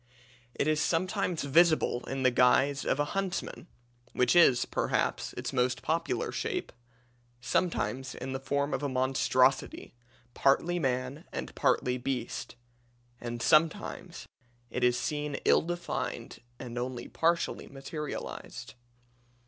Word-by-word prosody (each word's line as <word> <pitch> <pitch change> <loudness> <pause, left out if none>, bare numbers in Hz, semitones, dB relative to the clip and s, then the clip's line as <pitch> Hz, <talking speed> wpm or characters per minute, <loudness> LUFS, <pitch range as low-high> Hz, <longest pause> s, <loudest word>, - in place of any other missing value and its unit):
It - - 0
is 155 0 +2
sometimes 180 +1 0
visible 155 -3 +3
in 135 0 -3
the 130 - +5
guise 130 +3 +3
of 135 - +1
a 145 - +2
huntsman 195 -3 -3 0.5
which 125 +5 +2
is, 135 -8 +6
perhaps, - - -1
its - - -5
most 125 -1 +1
popular 165 +2 -1
shape 365 -1 -3 0.7
sometimes 130 -2 -1
in 130 0 -5
the 135 - -2
form 140 +2 -1
of - - -1
a 145 - -1
monstrosity, 130 0 +1 0.4
partly 165 +8 +2
man 130 +2 -2
and - - -5
partly 125 0 +1
beast 125 -2 -4 0.6
and 120 -1 -5
sometimes 165 +2 +1 0.5
it - - -2
is 125 0 +4
seen 150 +2 -2
ill - - +5
defined 175 +1 -4 0.2
and 120 -1 -6
only 125 -1 -4
partially 170 +1 0
materialized. 145 +2 -6
135 Hz, 125 wpm, -30 LUFS, 125-165 Hz, 0.7 s, is